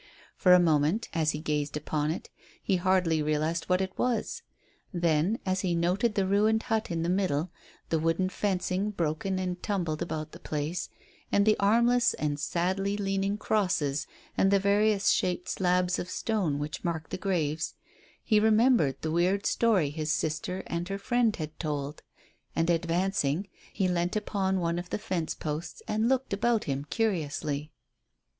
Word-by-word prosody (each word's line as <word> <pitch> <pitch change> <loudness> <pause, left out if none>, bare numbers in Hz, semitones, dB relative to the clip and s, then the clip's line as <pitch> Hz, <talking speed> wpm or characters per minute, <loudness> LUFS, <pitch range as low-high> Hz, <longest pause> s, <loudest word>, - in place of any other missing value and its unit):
For 180 - +4
a - - +6
moment, 160 +5 +2
as 160 -2 +1
he 150 - -1
gazed 150 -1 -2
upon 150 0 -1
it, 160 - -4 0.3
he 190 - +1
hardly 180 -3 +2
realized 155 +2 0
what 180 +1 +2
it 190 0 -3
was. 250 - -1 0.5
Then, 170 +2 +1
as 190 0 0
he 180 -3 0
noted 185 +6 +1
the 195 - +2
ruined 215 +3 +2
hut 220 -1 -1
in 165 -1 -1
the - - -1
middle, 180 -3 0 0.4
the 165 - +1
wooden 165 +3 +1
fencing 190 0 -1
broken 180 0 -1
and 180 -1 -3
tumbled 170 -7 -2
about 155 -1 -3
the - - -11
place, 155 +4 -3 0.4
and 200 0 +4
the 215 0 +5
armless 235 +4 +4
and 150 -1 -2
sadly 190 +5 0
leaning 195 0 -1
crosses 180 -10 0 0.3
and 195 - +3
the 200 - +5
various 200 +1 +3
shaped 180 -1 0
slabs 180 0 +1
of 175 - -4
stone 190 -12 -1
which 150 +3 -5
marked 165 -3 -3
the - - -1
graves, 160 -5 -1 0.5
he 215 -2 +3
remembered 220 - +4
the 160 - -1
weird 180 +4 +1
story 200 -11 +2
his 155 0 -2
sister 160 +5 -2
and 170 +2 -3
her 195 - -2
friend 235 +1 +1
had 155 -1 -6
told, 150 -2 -3 0.5
and, 165 +1 +2
advancing, 170 0 0 0.2
he 190 -2 0
leant 175 +1 0
upon 195 -3 0
one 170 0 0
of 175 0 -7
the - - -1
fence 185 -6 -3
posts 155 +2 -5
and 215 +2 +1
looked 265 -4 0
about 225 +2 +1
him 140 0 -3
curiously. 155 -8 -1
180 Hz, 165 wpm, -28 LUFS, 155-200 Hz, 0.5 s, a